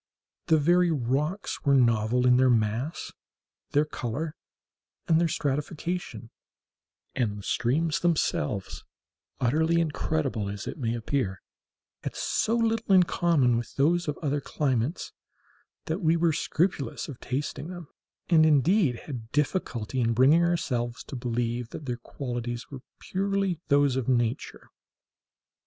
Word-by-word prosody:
The 160 - +5
very 175 +4 +4
rocks 150 - -1
were 140 -2 +4
novel 120 -1 +3
in 125 0 +6
their 130 0 +4
mass, 115 +6 0 0.6
their 145 +1 +2
color, 150 +2 -4 0.7
and 160 0 +4
their 170 - +3
stratification; 145 -4 -3 0.8
and 110 -5 -1
the 100 - -9
streams 150 +10 0
themselves, 105 - -1 0.6
utterly 160 +7 +2
incredible 150 -8 -1
as 100 0 -6
it - - -6
may 115 -2 -1
appear, 115 -5 -2 0.6
had - - -4
so 225 - 0
little 225 -2 0
in 185 - +7
common 150 -9 +2
with 120 -1 -5
those 170 +5 +2
of 150 - -2
other 145 -1 0
climates, 135 +1 -1 0.7
that 165 +4 -2
we 165 0 +3
were 165 -1 +2
scrupulous 165 -1 -1
of 135 -5 -9
tasting 140 +3 -4
them, 175 -3 -8 0.4
and, 165 -3 +5
indeed, 155 - +3
had 115 -6 -7
difficulty 130 - -1
in 115 0 +2
bringing 140 +8 +5
ourselves 130 -8 -1
to - - -8
believe 120 -1 -2
that 150 - -8
their 125 -2 -3
qualities 120 -1 -5
were 135 -2 -8 0.2
purely 195 -2 -1
those 140 -3 +3
of 130 -1 -1
nature. 120 0 -1
140 Hz, 135 wpm, -27 LUFS, 120-165 Hz, 0.8 s, in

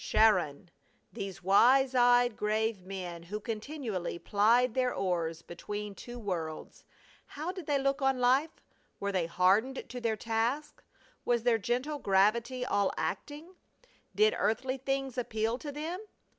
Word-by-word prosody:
Charon! 180 -7 +2 0.4
These 195 -1 -6
wise 255 +8 +5
eyed 245 -2 +4
grave 215 -1 0
men 180 -3 -6
who 195 +5 -5
continually 220 - -4
plied 225 +6 +3
their 255 0 +1
oars 170 -5 -2
between 205 +4 -6
two 240 +4 -9
worlds! 170 -8 -5 0.4
How 310 +5 -5
did 370 -4 -9
they 290 -2 +2
look 275 +1 0
on 270 -1 +2
life? 265 +6 +2 0.4
Were 200 0 -2
they 180 -4 0
hardened 195 +10 +2
to 250 0 -6
their 225 -2 0
task? 230 +7 -2 0.4
Was 240 -2 +1
their 235 -2 +3
gentle 255 +8 -2
gravity 230 +5 +2
all 200 -5 +1
acting? 305 +5 -4 0.6
Did 430 +1 +4
earthly 255 +4 0
things 270 -1 -2
appeal 225 0 -1
to 290 - -6
them? 315 +5 -4
230 Hz, 140 wpm, -31 LUFS, 200-265 Hz, 0.6 s, wise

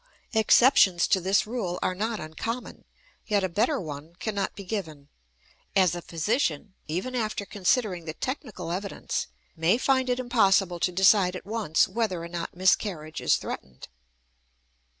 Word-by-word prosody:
Exceptions 220 - +5
to 190 - +2
this 190 +3 +2
rule 215 -6 -3
are 185 - +1
not 215 +3 -2
uncommon, 225 +11 -6 0.4
yet 205 -3 +1
a - - +2
better 220 - +1
one 155 +1 -8
cannot 200 +1 -3
be 200 - -8
given; 160 -8 -5 0.7
as 185 -4 +4
a 175 - -4
physician, 170 - -1
even 180 +12 -3
after 215 -4 -2
considering 195 -3 0
the 155 -1 -5
technical 255 - -5
evidence, 195 +3 -3 0.3
may 170 +7 +2
find 260 0 +1
it 250 0 +1
impossible 195 -7 +2
to 180 - +1
decide 190 0 +4
at 180 - -8
once 205 -7 +1
whether 190 -4 -2
or - - -5
not 170 -1 -5
miscarriage 180 -4 0
is - - +4
threatened. 65 0 -7
190 Hz, 150 wpm, -27 LUFS, 170-220 Hz, 0.7 s, Exceptions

